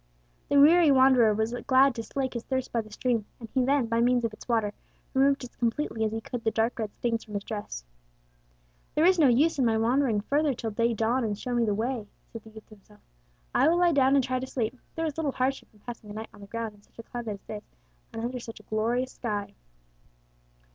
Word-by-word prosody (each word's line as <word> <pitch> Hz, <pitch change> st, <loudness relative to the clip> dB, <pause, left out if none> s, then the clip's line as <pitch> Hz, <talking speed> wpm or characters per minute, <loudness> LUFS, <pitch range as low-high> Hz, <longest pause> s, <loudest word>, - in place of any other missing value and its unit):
The 285 Hz, -, +5 dB
weary 325 Hz, +3 st, +7 dB
wanderer 260 Hz, -4 st, +6 dB
was 220 Hz, +2 st, -1 dB
glad 265 Hz, 0 st, +5 dB
to 235 Hz, -, -4 dB
slake 265 Hz, +2 st, -3 dB
his 235 Hz, -, -3 dB
thirst 260 Hz, -1 st, -2 dB
by 230 Hz, -, 0 dB
the 215 Hz, -, -14 dB
stream, 225 Hz, 0 st, -1 dB
and 230 Hz, -, -8 dB
he 260 Hz, -1 st, +2 dB
then, 275 Hz, 0 st, +2 dB
by 230 Hz, 0 st, 0 dB
means 245 Hz, 0 st, +3 dB
of 225 Hz, -, -3 dB
its -, -, -13 dB
water, 220 Hz, -3 st, +1 dB, 0.4 s
removed 275 Hz, +1 st, +3 dB
as 250 Hz, -, -10 dB
completely 230 Hz, -1 st, -1 dB
as 215 Hz, -, 0 dB
he 225 Hz, -, -2 dB
could 240 Hz, +1 st, -6 dB
the 220 Hz, -, +2 dB
dark 225 Hz, +2 st, 0 dB
red 215 Hz, -2 st, -2 dB
stains 230 Hz, -2 st, -1 dB
from 210 Hz, -, -10 dB
his 200 Hz, -, -2 dB
dress. 205 Hz, -, -6 dB, 1.1 s
"There 310 Hz, -, +4 dB
is 365 Hz, 0 st, +5 dB
no 300 Hz, -, +6 dB
use 280 Hz, +6 st, +3 dB
in 260 Hz, -, +3 dB
my 225 Hz, -1 st, +2 dB
wandering 235 Hz, -1 st, +2 dB
further 285 Hz, +4 st, +1 dB
till 225 Hz, -1 st, -4 dB
day 230 Hz, +2 st, +1 dB
dawn 230 Hz, +4 st, +1 dB
and 210 Hz, -2 st, -2 dB
show 250 Hz, +3 st, -4 dB
me 240 Hz, -1 st, +2 dB
the 210 Hz, -2 st, 0 dB
way," 230 Hz, 0 st, -2 dB, 0.3 s
said 230 Hz, -, -7 dB
the 220 Hz, -, -13 dB
youth 220 Hz, 0 st, -13 dB
to 215 Hz, -, -13 dB
himself. 210 Hz, +1 st, -22 dB, 0.5 s
"I -, -, +4 dB
will 335 Hz, +2 st, +4 dB
lie 350 Hz, -1 st, +4 dB
down 270 Hz, -1 st, +4 dB
and 275 Hz, -, +4 dB
try 255 Hz, 0 st, -1 dB
to 260 Hz, -, -5 dB
sleep. 240 Hz, -2 st, -2 dB, 0.2 s
There 325 Hz, -, -1 dB
is 310 Hz, -2 st, -3 dB
little 290 Hz, -4 st, -1 dB
hardship 265 Hz, +2 st, -1 dB
in 210 Hz, -, -24 dB
passing 235 Hz, -3 st, -9 dB
a -, -, -7 dB
night 220 Hz, +1 st, -6 dB
on -, -, -15 dB
the 200 Hz, -, -10 dB
ground 230 Hz, 0 st, -4 dB
in 205 Hz, -, -21 dB
such -, -, -30 dB
a 230 Hz, -, -8 dB
climate 230 Hz, -3 st, -5 dB
as 195 Hz, -, -18 dB
this, 210 Hz, -1 st, -7 dB, 0.5 s
and 225 Hz, -, -5 dB
under 250 Hz, +1 st, -3 dB
such 225 Hz, -2 st, -9 dB
a -, -, -16 dB
glorious 235 Hz, +5 st, -1 dB
sky." 205 Hz, -4 st, -4 dB
235 Hz, 245 wpm, -27 LUFS, 220-265 Hz, 1.1 s, weary